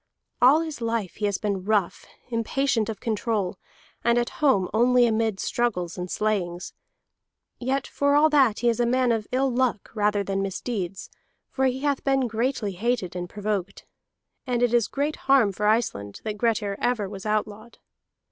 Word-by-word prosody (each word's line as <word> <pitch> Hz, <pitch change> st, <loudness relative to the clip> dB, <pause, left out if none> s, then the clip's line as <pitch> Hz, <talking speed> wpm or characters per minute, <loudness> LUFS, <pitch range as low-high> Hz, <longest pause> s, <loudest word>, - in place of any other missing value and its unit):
All 270 Hz, +6 st, +6 dB
his 315 Hz, -6 st, -6 dB
life 230 Hz, -5 st, -2 dB
he 210 Hz, -, -1 dB
has 200 Hz, -1 st, -1 dB
been 200 Hz, -3 st, -2 dB
rough, 205 Hz, -3 st, 0 dB, 0.2 s
impatient 230 Hz, 0 st, 0 dB
of 215 Hz, -3 st, -5 dB
control, 215 Hz, -4 st, -2 dB, 0.4 s
and 235 Hz, 0 st, +3 dB
at 240 Hz, 0 st, 0 dB
home 205 Hz, -11 st, +3 dB
only 245 Hz, +2 st, +4 dB
amid 220 Hz, -3 st, 0 dB
struggles 180 Hz, -8 st, -1 dB
and 180 Hz, 0 st, -5 dB
slayings. 180 Hz, -5 st, -2 dB, 0.9 s
Yet 265 Hz, +2 st, -1 dB
for 285 Hz, 0 st, +1 dB
all 300 Hz, +2 st, +6 dB
that 265 Hz, -8 st, +3 dB
he 240 Hz, -, +3 dB
is 230 Hz, -, 0 dB
a 240 Hz, -, +2 dB
man 250 Hz, 0 st, +2 dB
of 220 Hz, -2 st, -1 dB
ill 265 Hz, +1 st, +1 dB
luck 245 Hz, -4 st, -1 dB
rather 210 Hz, -2 st, +1 dB
than 195 Hz, 0 st, -2 dB
misdeeds, 195 Hz, -1 st, -4 dB, 0.4 s
for 265 Hz, -, 0 dB
he 260 Hz, 0 st, 0 dB
hath 285 Hz, -2 st, 0 dB
been 270 Hz, -1 st, +2 dB
greatly 230 Hz, -1 st, -1 dB
hated 200 Hz, -1 st, -2 dB
and 175 Hz, -1 st, -4 dB
provoked. 200 Hz, -2 st, -3 dB, 0.6 s
And 245 Hz, -1 st, 0 dB
it 240 Hz, -1 st, +2 dB
is 235 Hz, -2 st, +3 dB
great 290 Hz, +2 st, -2 dB
harm 265 Hz, -7 st, +5 dB
for 210 Hz, +2 st, -1 dB
Iceland 105 Hz, -, 0 dB
that 215 Hz, -1 st, -3 dB
Grettir 210 Hz, -2 st, 0 dB
ever 240 Hz, -5 st, 0 dB
was 195 Hz, +1 st, -7 dB
outlawed. 215 Hz, +2 st, -3 dB
225 Hz, 170 wpm, -25 LUFS, 200-250 Hz, 0.9 s, All